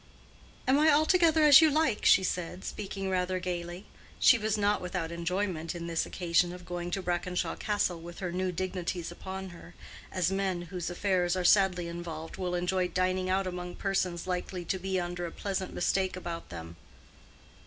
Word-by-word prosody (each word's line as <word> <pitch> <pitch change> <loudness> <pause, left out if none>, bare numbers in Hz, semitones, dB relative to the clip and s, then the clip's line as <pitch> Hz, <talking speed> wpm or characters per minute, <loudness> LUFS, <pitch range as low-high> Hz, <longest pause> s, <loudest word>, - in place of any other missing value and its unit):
"Am 265 +2 +4
I 310 +1 +5
altogether 315 +1 +4
as 295 0 +9
you 320 - +6
like?" 295 -7 +1
she 190 - +7
said, 180 0 -3
speaking 195 -1 -4
rather 185 0 0
gaily. 175 +1 -4 0.3
She 245 - +6
was 215 0 0
not 205 0 +2
without 180 -2 -3
enjoyment 170 -1 -2
in 170 -1 -5
this 165 -1 -1
occasion 175 0 +1
of 180 -1 -10
going 175 0 -4
to 195 +1 -2
Brackenshaw 180 0 -1
Castle 195 -5 0
with 170 +1 -10
her 180 -2 -3
new 185 +1 -1
dignities 180 -1 -3
upon 190 +2 -6
her, 175 0 -13 0.4
as 185 -1 0
men 190 -2 -1
whose 175 0 -5
affairs 180 -1 +1
are 180 -1 -1
sadly 180 -2 +4
involved 170 -2 -6
will 180 -1 -2
enjoy 180 +1 0
dining 185 0 0
out 190 +1 +1
among 180 -1 -5
persons 185 -3 -1
likely 180 -1 -3
to 190 - -1
be 190 0 -1
under 175 0 -3
a - - -7
pleasant 190 0 -3
mistake 190 +1 0
about 170 -2 -6
them. 85 -1 -8
180 Hz, 175 wpm, -30 LUFS, 175-195 Hz, 0.4 s, as